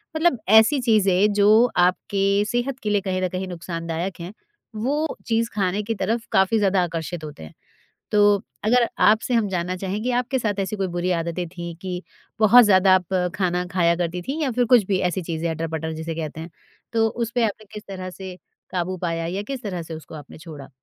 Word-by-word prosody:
मतलब 315 -7 +2
ऐसी 220 +7 +6
चीज़ें 205 -3 +3
जो 205 0 +3 0.3
आपके 195 +3 +2
सेहत 245 +4 -2
के 210 - -1
लिए 205 -1 +2
कहीं 185 -1 -2
न 185 - +1
कहीं 185 +1 -4
नुक़सानदायक 170 +1 -5
हैं, 175 +4 -7 0.4
वो 285 +8 -1
चीज़ 230 0 +1
खाने 200 0 -1
की 225 +2 -3
तरफ़ 225 +4 -2
काफ़ी 190 +4 +3
ज़्यादा 195 -3 +2
आकर्षित 165 -1 -4
होते 150 - -9
हैं। 80 - -11 0.6
तो 205 -1 +4 0.2
अगर 235 +2 +3 0.2
आपसे 220 +3 +3
हम 225 -3 +2
जानना 180 -1 -2
चाहेंगे, 200 +6 -3
आपके 250 +2 0
साथ 210 -4 -2
ऐसी 195 +2 -3
कोई 195 -2 -1
बुरी 175 +1 -1
आदतें 170 +1 -2
थी 170 -1 -7
कि, 185 -1 -4 0.4
बहुत 230 +3 +8
ज़्यादा 190 -2 +5
आप 185 0 0 0.2
खाना 180 -2 0
खाया 170 -2 +3
करती 175 0 -3
थीं 275 - -4
या 280 - 0
फ़िर 245 +1 +1
कुछ 235 -3 +5
भी 195 -2 +1
ऐसी 185 +2 -3
चीज़ें, 165 0 -3
अटर-पटर 160 0 -3
जिसे 160 +1 -5
कहते 160 -1 -5
हैं, 165 +2 -8 0.4
तो 225 -1 +3
उस 230 +1 -3
पे 240 - +2
आपने 215 0 -3
किस 210 -1 -7
तरह 185 -1 -6
से 185 0 -9 0.3
काबू 185 +1 -2
पाया 165 -1 -2
या 190 +4 -3
किस 255 -2 -5
तरह 180 -5 -4
से 165 0 -8
उसको 160 0 -11
आपने 150 0 -11
छोड़ा? 155 -4 -10
190 Hz, 200 wpm, -23 LUFS, 175-215 Hz, 0.6 s, बहुत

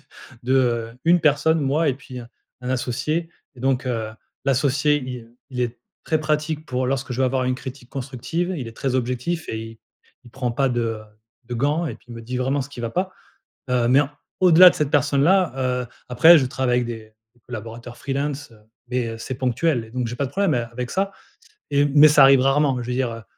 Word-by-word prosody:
t - - -27 0.4
de 120 -3 +1
1 175 +1 +5
personne, 155 +2 +3
moi 145 +3 +1
et 135 - +1
puis, 130 -1 -10
heu, 120 - -10 0.3
un 125 +1 -4
associé. 150 +6 -1 0.3
Et 120 - -14
donc, 130 0 0
heu, 110 -3 -2 0.3
l'associé 140 +2 +2
il, 125 -1 -6
heu, 115 +1 -24
il 125 -1 -4
est 120 -1 -2 0.3
très 155 -1 0
pratique 155 0 -1
pour 130 -1 -1
lorsque 135 0 -2
je 125 - -3
vais - - +4
avoir 130 0 0
une 125 0 0
critique 130 -1 -9
constructive, 140 +7 -3
il 125 -5 -5
est 115 - -13
très 135 -2 -2
objectif 125 +7 -2
et 110 - -3
il 115 0 -9 0.5
il 120 - -15
prend 125 0 -3
pas 135 +3 +1
de 115 -3 -2 0.4
de 120 +1 -6
gants 145 +7 0
et - - -4
puis - - -21
il 120 - -9
me 115 - -9
dit 125 +3 -5
vraiment 135 +3 0
ce 135 - -9
qui 140 - -9
va 115 -1 -3
pas. 185 +4 -2 0.6
Heu, 125 -2 +2
mais 135 +3 +6
en 145 - -2 0.3
au-delà 180 0 +9
de - - -4
cette 150 -2 0
personne-là, 145 +6 +3 0.3
heu, 120 - -7 0.2
après 160 +8 +7
je 135 - +2
travaille 125 -1 0
avec 125 - 0
des 110 -2 -8 0.2
des 120 - -30
collaborateurs 120 +1 -8
freelances, 140 0 -3
heu, 110 - -18 0.3
mais, 125 -2 -1
heu, 115 - -6
c'est 125 +3 -5
ponctuel 130 +1 0
et 110 - -16
donc 125 -1 -2
j'ai 120 - -5
pas 140 - -1
de - - -8
problème 195 -5 +1
a 120 -1 0
avec 125 +1 -5
ça 195 +1 0 0.6
et 145 0 +3
mais 145 +2 +7
ça 150 -2 +6
arrive 135 0 +7
rarement. 135 -1 +2
Je 120 - -7
veux 125 - -2
dire, 115 -3 -2
130 Hz, 225 wpm, -22 LUFS, 120-145 Hz, 0.6 s, au-delà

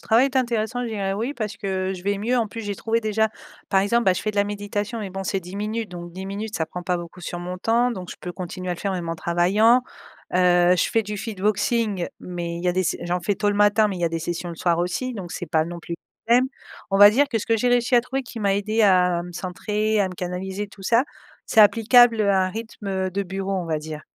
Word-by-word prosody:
travail 230 +4 +4
est 270 -1 -3
intéressant 240 -1 0
je - - -3
dirais: 200 -3 -2
«oui» 230 +8 -2
parce 215 -4 -4
que 190 -2 -2
je 180 - -9
vais 200 +1 0
mieux, 235 +5 0
en 230 - +1
plus, 225 +2 -7
j'ai 205 -1 -3
trouvé 225 +3 -1
déjà, 220 0 +1 0.4
par 195 -2 +3
exemple, 235 +4 +2
bah, 190 - +5
je 180 - -3
fais 215 - 0
de 210 - -11
la 200 - +4
méditation 205 +2 -3
mais 200 -2 -5
bon 195 +1 -5
c'est 195 +1 -1
10 180 +2 -9
minutes 215 +2 -3
donc 175 -1 -8
10 190 +2 -7
minutes 205 +2 -5
ça 160 - -1
prend 180 +3 -7
pas 180 0 0
beaucoup 175 +1 -9
sur 175 0 -5
mon 180 +1 -5
temps 235 +5 +2
donc 185 -6 -6
je - - -8
peux 180 - -6
continuer 185 0 -6
à - - 0
le - - -13
faire 200 +1 -2
même 175 -3 -4
en 165 - -1
travaillant, 195 +9 +3 0.5
heu, 180 0 +5
je - - +1
fais 225 - +2
du 210 0 -5
Fitboxing 210 -1 0
mais 175 -1 -5
il 170 - -6
y - - +3
a - - +2
des 185 - +1
s 180 - 0
j'en 175 +1 -1
fais 200 +4 0
tôt 205 +2 0
le 205 - +1
matin 205 +1 +4
mais 195 - -4
il - - -6
y - - +1
a - - +2
des 165 0 -3
sessions 175 +2 -4
le - - -6
soir 170 0 +1
aussi 180 +9 -1
donc 180 -5 -7
c'est 175 - -5
pas 155 0 +1
non 170 +1 -6
plus 170 - -8 0.4
un 235 - +6
problème, 255 +2 +4 0.4
on 195 - +2
va 205 0 +10
dire 280 +6 +3
que 235 -5 0
ce - - -6
que 225 - +3
j'ai 245 +3 +1
réussi 245 +1 +2
à 240 - +7
trouver 255 +3 -3
qui 240 -2 -9
m'a 200 -2 +2
aidé 215 +3 0
à 180 -3 +4
me 175 0 -9
centrer, 210 +5 -1
à 195 - +2
me 180 - -8
canaliser, 190 +3 -4
tout 200 - -15
ça 230 +6 +3 0.4
c'est 220 - +4
applicable, 230 +2 +6
heu, 205 -1 +3
à 190 -1 +3
un - - -2
rythme, 225 0 -8
heu, 190 -1 -1
de 200 +2 -1
bureau 195 +1 -4
on 180 -3 -2
va 160 -1 -1
dire, 155 0 -7
200 Hz, 285 wpm, -23 LUFS, 180-220 Hz, 0.5 s, va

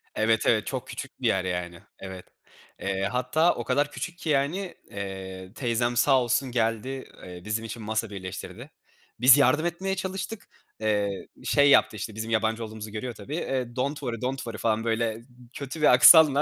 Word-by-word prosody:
Evet, 110 0 +2
evet, 110 -3 +2
çok - - -4
küçük - - -8
bir - - +1
yer, 95 -1 +1
yani. 90 -1 -3 0.2
Evet. 95 -1 -8 0.5
Eee, 95 0 -2
hatta 130 +7 +2
o 120 - -4
kadar 145 +5 +1
küçük 175 -1 -6
ki, 165 - -5
yani, 155 +7 0 0.2
eee, 95 -1 -7
teyzem 120 -1 0
sağ 130 +1 +4
olsun 125 +2 0
geldi, 120 +3 -1 0.2
eee, 90 -1 -9
bizim 110 +2 -2
için 115 0 -7
masa 110 0 -2
birleştirdi. 95 -1 -8 0.5
Biz 125 +3 +8
yardım 145 +4 +3
etmeye 190 +3 -2
çalıştık, 190 +3 -5 0.3
eee, 105 -3 -1 0.2
şey 145 0 +4
yaptı, 125 - +5
işte, 105 +1 -6
bizim 110 +1 -5
yabancı 110 +1 0
olduğumuzu 110 0 -8
görüyor 120 +3 -5
tabii. 105 +7 -7
Eee, 130 -7 -3
"Don't 140 +4 -1
worry, 120 -4 -4
don't 130 +2 -1
worry" 115 -4 -6
falan 110 0 0
böyle 115 0 -1 0.3
kötü 145 +3 -6
bir 150 - +6
aksanla 145 +2 +8
115 Hz, 175 wpm, -26 LUFS, 105-140 Hz, 0.5 s, Biz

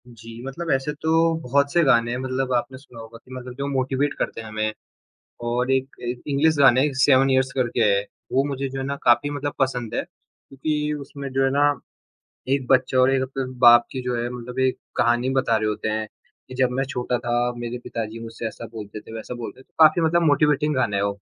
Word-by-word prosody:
जी, 115 -1 -11
मतलब 165 +5 -5
ऐसे 135 +2 0
तो 160 - -1 0.3
बहुत 140 +1 +1
से 175 - +4
गाने 120 -4 +3
हैं 120 - -2
मतलब 130 0 -2
आपने 125 +2 -1
सुना 130 -3 -14
होगा 115 0 -10
कि 130 - -17
मतलब 125 -1 -7
जो 140 0 -3
मोटीवेट 135 +1 0
करते - - -2
हैं 110 - -9
हमें। 110 0 -2 0.7
और 125 +2 0
एक 135 0 0
ए 120 0 -2 0.2
इंग्लिश 155 +3 +3
गाने 130 -2 +6 0.2
सेवन 135 -1 +5
इयर्स 130 0 +2
करके 125 -2 -1
है, 100 -2 +3 0.3
वो 135 - +3
मुझे 140 -1 -3
जो 135 +1 -5
है 135 - -3
ना 140 +1 -2
काफ़ी 120 +4 +4
मतलब 145 0 -3
पसंद 125 -4 -1
है, - - +1
क्योंकि 150 +2 -5
उसमें 140 0 -7
जो 135 0 +2
है 135 - +3
ना 140 +1 +2 0.9
1 135 -2 0
बच्चा 130 0 +3
और 130 +1 +5
1 135 -1 +2
अपने 130 0 -3
बाप 120 -1 +8
की 130 - -4
जो 125 -1 -2
है 120 +1 -2
मतलब 125 +1 -7
एक 130 0 +2 0.2
कहानी 120 +2 +2
बता 115 -3 +1
रहे 110 0 0
होते 105 +1 -3
हैं 110 0 -2 0.4
कि 130 - -9
जब 130 -1 +2
मैं - - +2
छोटा 125 -2 -1
था 120 0 -2 0.2
मेरे 120 0 -4
पिताजी 115 0 -5
मुझसे 115 0 -7
ऐसा 115 +1 -8
बोलते 105 -1 -7
थे 110 - -13
वैसा 115 +2 -6
बोलते 120 +2 -8
थे, - - -22
काफ़ी 155 +2 +6
मतलब 165 +1 +3
मोटिवेटिंग 150 -1 +2
गाना 120 -6 0
है 100 - 0
वो। 100 0 -2
130 Hz, 220 wpm, -23 LUFS, 120-135 Hz, 0.9 s, बाप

